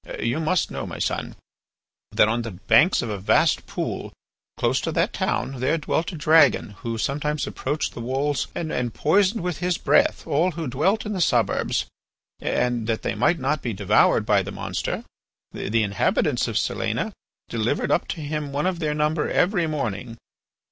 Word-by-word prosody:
You 120 +6 0
must 165 +2 +1
know, - - -4
my - - -7
son, - - -2 0.8
that - - +4
on 115 +2 0
the 115 - -5
banks 115 - +3
of 115 - -3
a 100 - -4
vast 95 - +2
pool - - -4 0.5
close 130 +2 +1
to 165 - -2
that 170 +7 +1
town 135 -8 -2
there 130 +6 +1
dwelt 160 +2 -1
a - - -7
dragon 155 -6 +4
who 115 -1 -4
sometimes 150 +5 -1
approached 145 +3 -3
the 120 - -7
walls 135 +3 -1
and 125 -8 -2
poisoned 195 +5 +2
with 180 -4 -2
his 180 -1 0
breath 300 +2 +2
all 165 +5 +1
who 165 0 -4
dwelt 185 - +1
in 210 - -3
the 185 - -2
suburbs. - - +1 0.5
And 120 -3 0
that 115 -1 -1
they - - -1
might 175 - +2
not 140 +2 -1
be 120 - -3
devoured 100 -1 +3
by - - +3
the - - -6
monster, - - -3 0.5
the 115 +1 0
inhabitants 100 -1 +1
of - - -1
Silena - - -1 0.3
delivered 115 +5 -1
up - - +1
to 165 - -4
him 150 -1 -3
one 145 +3 -1
of 185 -2 0
their 150 -2 -1
number 150 +1 0
every 180 -2 +2
morning. 120 -6 -3
150 Hz, 175 wpm, -24 LUFS, 120-170 Hz, 0.8 s, that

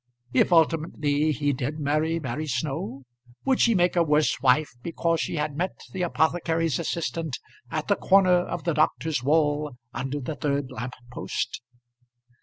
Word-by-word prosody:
If 130 - +3
ultimately 155 -2 +2
he 145 -1 0
did 135 +4 -3
marry 155 +3 +1
Mary 150 +2 -4
Snow, 135 -1 -3 0.4
would 265 -2 +2
she 230 -2 +4
make 175 -1 +3
a 175 - +4
worse 150 -2 +2
wife 140 +3 +3
because 165 +2 0
she - - -2
had 150 -2 -2
met 180 +5 -2
the 190 - -4
apothecary's 165 -2 +1
assistant 165 -3 -2 0.3
at - - -3
the - - +3
corner 185 -2 +5
of 175 - -4
the 170 - 0
doctor's 155 -2 +1
wall, 150 -1 +1 0.2
under 135 +4 -3
the 140 +3 -4
third 140 -2 -2
lamp 125 0 -5 0.2
post? - - -3
155 Hz, 155 wpm, -26 LUFS, 140-165 Hz, 0.4 s, corner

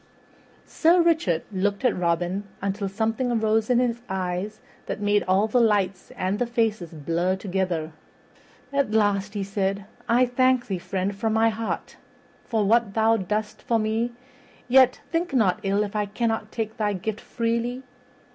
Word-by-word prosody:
Sir 335 +2 +3
Richard 320 - +2
looked 200 +4 -1
at 250 - +3
Robin 175 +3 -1
until 200 0 -2
something 225 +5 -1
arose 220 -1 +1
in 250 - +4
his 240 -1 +1
eyes 190 +3 -3 0.3
that - - -3
made 205 0 +2
all 190 +3 +3
the 240 +3 +2
lights 200 -4 +1
and 190 +3 -1
the 245 - 0
faces 220 -7 -1
blur 170 +4 -1
together. 185 -4 -2 0.8
At 280 -4 +1
last 205 -1 +1
he 200 - -1
said, 195 0 -2 0.2
"I 245 +2 +5
thank 255 0 +2
thee, 190 -3 -3
friend, 190 +2 -2
from 220 +2 -1
my 225 +1 +4
heart, 225 +1 -4 0.5
for 220 -3 0
what 225 -1 +2
thou 225 0 +4
doest 210 +1 -3
for 230 - +1
me; 225 +2 -1 0.5
yet, 255 0 +5
think 335 -2 -1
not 215 -4 +3
ill 200 0 +1
if 205 0 -6
I 210 -1 0
cannot 225 0 -2
take 220 0 -4
thy 210 -2 0
gift 205 +3 -4
freely. 235 +2 -2
215 Hz, 160 wpm, -25 LUFS, 195-230 Hz, 0.8 s, I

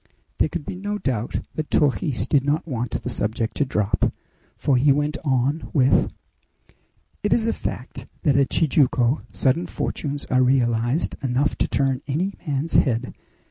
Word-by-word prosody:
There - - +3
could 170 -3 -5
be - - -5
no 205 +2 -3
doubt 125 - -2
that 155 -1 -4
Torres 145 -1 +1
did 140 -3 +2
not 150 +4 0
want 120 -5 -3
the - - -3
subject 110 +1 -2
to 145 - +2
drop, 105 -5 +1 0.5
for 140 - +2
he 140 +3 +4
went 145 +2 +1
on 135 +2 0
with: 135 -3 +3 1.1
"It 210 - -1
is 225 - +3
a 230 - +1
fact - - -5 0.2
that 145 -6 +3
at 140 -1 +3
Tijuco 135 -4 +2
sudden 155 +7 +1
fortunes 145 -1 -3
are 130 0 +2
realized 125 +2 +1
enough 135 +2 +1
to - - +2
turn 135 -2 0
any 175 +8 -1
man's 145 +3 -1
head! 125 -2 +1
140 Hz, 160 wpm, -23 LUFS, 125-150 Hz, 1.1 s, he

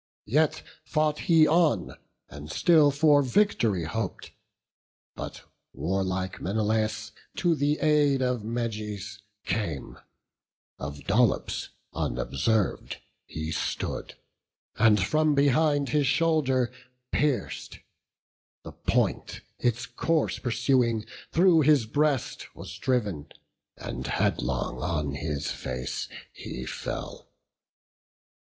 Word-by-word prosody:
Yet 155 +6 +2 0.2
fought 155 -1 0
he 160 -2 +7
on, 155 - +2 0.4
and 75 +1 -10
still 155 - +5
for 145 0 +4
vict'ry 120 - +2
hop'd; 100 +5 -4 0.8
But - - -7 0.3
warlike 95 0 -2
Menelaus 110 +2 0 0.2
to 175 -2 +2
the 150 0 +1
aid 150 -3 +3
Of 125 -2 0
Meges 105 -3 -4 0.3
came; 90 -8 -3 0.8
of 70 0 -6
Dolops 110 +2 +1 0.2
unobserv'd 80 - -1 0.3
He 80 0 -5
stood, - - -3 0.6
and 110 -1 +5
from 155 +9 +2
behind 145 0 +3
his 145 +1 +2
shoulder 135 -4 +2 0.4
pierc'd; 145 -3 -1 0.9
The - - -8
point, - - -1 0.2
its 120 0 0
course 150 +1 0
pursuing, 120 -1 +1 0.3
through 170 -1 +5
his 145 -5 +4
breast 145 +2 0
Was - - -9
driv'n, 105 - -1 0.5
and - - -5
headlong - - -1
on 75 -2 -1
his 70 0 -3
face 65 0 -4 0.2
he 65 - -7
fell. - - -6
120 Hz, 95 wpm, -27 LUFS, 95-150 Hz, 0.9 s, he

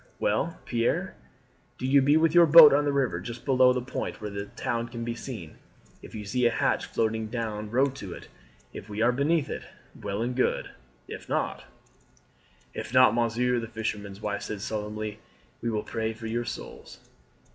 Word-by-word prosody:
Well, 110 +11 -1
Pierre, 130 +11 0 0.6
do - - -5
you 135 +1 +5
be 145 +3 +4
with 160 0 +3
your 175 -1 +7
boat 155 -1 +10
on 145 +1 +3
the 145 - +1
river 130 -11 0
just 120 +6 -8
below 130 -2 +5
the 125 -1 -1
point 125 - -5
where 105 -1 -5
the 100 0 -5
town 115 +2 -3
can 120 -1 -6
be 120 0 -2
seen. 110 - -8 0.4
If - - -11
you 105 -1 -6
see 125 +4 +2
a - - +4
hatch 115 - 0
floating 110 0 -1
down 110 -2 -4
row 130 +5 +3
to 100 -8 -8
it. - - -11 0.5
If - - -9
we 105 +2 -1
are 120 - +4
beneath 145 +4 +1
it, - - -5 0.3
well 100 +2 -4
and 125 +1 -2
good; 130 - 0 0.4
if - - -9
not - - -2 0.5
" - - -34
"If - - -9
not, 130 0 +6
monsieur," 120 +1 +1
the 115 - -5
fisherman's 105 -3 -5
wife 105 -1 -3
said 105 -2 -5
solemnly, 105 0 -4 0.4
"we 115 - -1
will 110 -2 -1
pray 110 0 -3
for 110 +1 -10
your 120 +2 -2
souls." - - -8
115 Hz, 190 wpm, -27 LUFS, 105-130 Hz, 0.6 s, boat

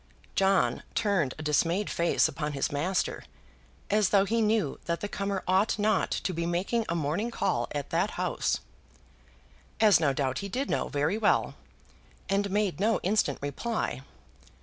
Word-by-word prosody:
John 195 -1 +2
turned 195 - +1
a 155 - -7
dismayed 165 +6 +1
face 170 0 +2
upon 150 -2 -4
his 135 - -1
master, 170 +6 -1 0.7
as 210 -2 +3
though 200 -1 +4
he 230 +3 +1
knew 215 -9 +1
that 170 0 -1
the 205 - -3
comer 200 -1 -3
ought 190 +4 +2
not 210 -1 +1
to 185 - -2
be 170 0 -2
making 195 +7 0
a 170 - 0
morning 165 +8 -1
call 235 - -1
at 145 -1 -4
that - - +1
house, - - -1 1.2
as 210 -6 +6
no 150 -4 +2
doubt 135 -1 -1
he 200 - -5
did 265 +7 -2
know - - 0
very 145 +9 0
well, 210 - +2 0.8
and 200 +1 +1
made 205 -2 0
no 220 +3 +2
instant 185 -7 +1
reply. 145 - -2
195 Hz, 160 wpm, -28 LUFS, 160-210 Hz, 1.2 s, as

